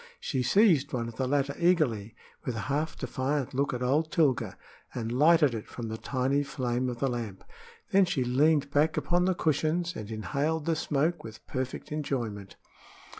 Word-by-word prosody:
She 130 -4 -2
seized 150 - +4
one 120 -2 -1
of 115 -1 -9
the 130 - 0
latter 140 +1 0
eagerly, 140 - +1 0.3
with 125 - -3
a 110 - -3
half 150 +3 -2
defiant 135 0 -2
look 140 +2 0
at 125 -1 -3
old 150 +5 +1
Tilga, 130 - +1 0.4
and 115 -2 -3
lighted 150 +1 +5
it 110 -2 -5
from 115 -2 -6
the 110 - -4
tiny 135 +2 0
flame 130 -2 -2
of 120 - -5
the 135 - +1
lamp. 115 -6 -4 0.5
Then 195 0 +5
she 160 -7 0
leaned 140 +3 +2
back 150 +2 +2
upon 175 0 +2
the 185 -1 +2
cushions 165 +3 0
and 105 -1 -6
inhaled 140 - -2
the 165 -1 +1
smoke 155 +2 0
with 110 -1 -10
perfect 130 +1 -4
enjoyment. 120 -10 -3
140 Hz, 175 wpm, -29 LUFS, 120-155 Hz, 0.5 s, lighted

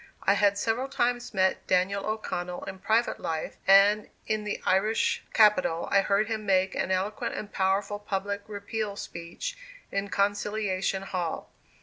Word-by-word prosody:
I 200 - +4
had 200 0 +3
several 230 +5 0
times 245 -2 0
met 190 -2 +1
Daniel 195 +2 +1
O'Connell 180 -5 -3
in 190 -1 -7
private 220 +5 +1
life 160 -1 -4
and 200 +2 +6 0.2
in 215 -1 -1
the 210 - -3
Irish 205 +4 +2
capital 205 -6 +4
I 200 - +5
heard 200 +2 +1
him 220 -1 -3
make 190 -1 +2
an - - -1
eloquent 190 +3 -1
and 210 - -6
powerful 195 +1 0
public 200 0 -3
Repeal 205 0 -4
speech 170 - -6 0.4
in 200 0 -1
Conciliation 200 -1 0
Hall. 180 -4 -4
200 Hz, 145 wpm, -28 LUFS, 190-215 Hz, 0.4 s, and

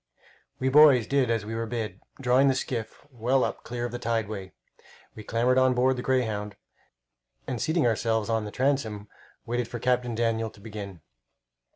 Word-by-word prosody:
We 130 - 0
boys 140 -4 +7
did 135 -1 +1
as 115 -2 0
we 110 - -5
were 115 0 -3
bid, 110 -4 -4 0.2
drawing 130 +1 +4
the 135 - +3
skiff 120 -4 -4
well 125 +2 +1
up - - -3
clear 120 0 -4
of 120 - -4
the 120 - -5
tideway. 110 -5 -2 0.6
We 110 - -10
clambered 120 +4 +2
on 130 -1 +3
board 130 +1 +3
the 125 - -4
Greyhound 110 -6 -1 0.9
and, 125 -3 -4
seating 160 -2 +1
ourselves 110 -1 +1
or 115 -1 +1
the 105 - -5
transom, 110 -5 -1 0.4
waited 120 0 -2
for 120 - -6
Captain 125 0 0
Daniel 115 -1 0
to 105 - -18
begin. 100 -5 -8
115 Hz, 175 wpm, -27 LUFS, 110-130 Hz, 0.9 s, boys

